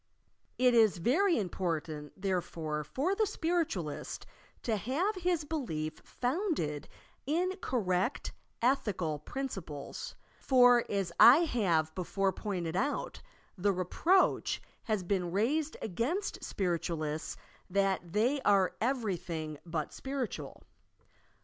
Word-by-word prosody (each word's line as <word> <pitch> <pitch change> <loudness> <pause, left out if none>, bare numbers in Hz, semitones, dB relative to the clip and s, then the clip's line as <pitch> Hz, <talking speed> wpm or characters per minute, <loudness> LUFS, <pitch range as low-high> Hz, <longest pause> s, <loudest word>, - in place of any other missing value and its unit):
It 250 -1 +4
is 220 -4 +5
very 330 - +3
im 205 -5 0
portant, 160 -4 -3
therefore, 165 -5 -2
for 275 - -1
the 430 +1 +1
Spiritualist 320 - -2 0.4
to 225 - +1
have 275 - 0
his 350 -4 0
belief 185 - -3
founded 250 - -2 0.4
in 360 +5 +1
correct 195 -1 0 0.3
ethical 190 - +1
principles, 190 - -6 0.2
for, 245 -2 +6
as 195 -4 -1
I 255 +8 +10
have 170 - +1
before 190 +2 0
pointed 180 -6 -3
out, 280 +9 -1 0.3
the 200 +1 +2
reproach 195 - +2 0.3
has 215 -4 0
been 180 -2 -1
raised 285 - 0
against 260 - -2
Spiritualists 165 -4 -2 0.3
that 190 -2 0
"they 245 - +2
are 195 -5 +3
everything 180 - -2
but 160 -3 -3
spiritual." 270 -3 -5
205 Hz, 105 wpm, -32 LUFS, 170-270 Hz, 0.4 s, I